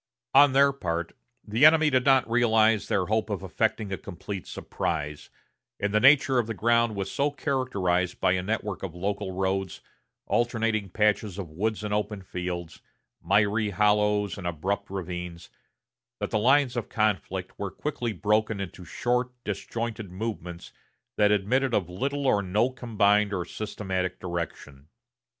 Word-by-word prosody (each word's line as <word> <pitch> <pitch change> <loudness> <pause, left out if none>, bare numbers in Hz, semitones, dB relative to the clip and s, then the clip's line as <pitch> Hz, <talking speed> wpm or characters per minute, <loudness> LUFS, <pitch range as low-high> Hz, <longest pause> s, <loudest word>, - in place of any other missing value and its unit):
On 140 0 +7
their 140 +1 +5
part, 85 -9 -3 0.3
the 110 +6 0
enemy 155 0 +7
did 130 -1 +2
not 135 -2 +4
realize 115 -2 +3
their 95 - +1
hope 110 +3 0
of 100 -3 -3
effecting 110 +3 -1
a - - -4
complete 95 +1 -7
surprise, 75 -2 -4 0.5
and 105 0 -1
the 105 - +4
nature 135 0 +5
of 115 - -1
the 115 - -4
ground 115 +1 +2
was 100 -1 -3
so 140 +1 +1
characterized 100 - -1
by - - +3
a 90 0 +1
network 105 0 -3
of 90 -4 -6
local 100 +2 -3
roads, 95 0 -2 0.5
alternating 115 -4 0
patches 105 -1 +1
of 90 -6 -6
woods 110 +6 -2
and 105 -1 -2
open 105 -1 -2
fields, 90 -2 -5 0.4
miry 105 +3 +2
hollows 105 0 +2
and 90 - -4
abrupt 95 +5 -2
ravines, 90 -2 -6 0.7
that - - -3
the 110 - +1
lines 130 +2 +3
of 120 -2 -3
conflict 105 -5 -1
were - - -2
quickly 125 -6 -3
broken 105 +1 0
into 95 -1 -6
short, 125 +6 -1
disjointed 110 0 -4
movements 90 -4 -6 0.4
that 105 -1 +4
admitted 120 +6 +1
of 90 -4 0
little 140 +9 -2
or 105 -6 +3
no 105 +7 +1
combined 105 -4 +2
or 90 -3 -2
systematic 95 -4 -4
direction. 85 -5 -6
105 Hz, 150 wpm, -27 LUFS, 95-115 Hz, 0.7 s, On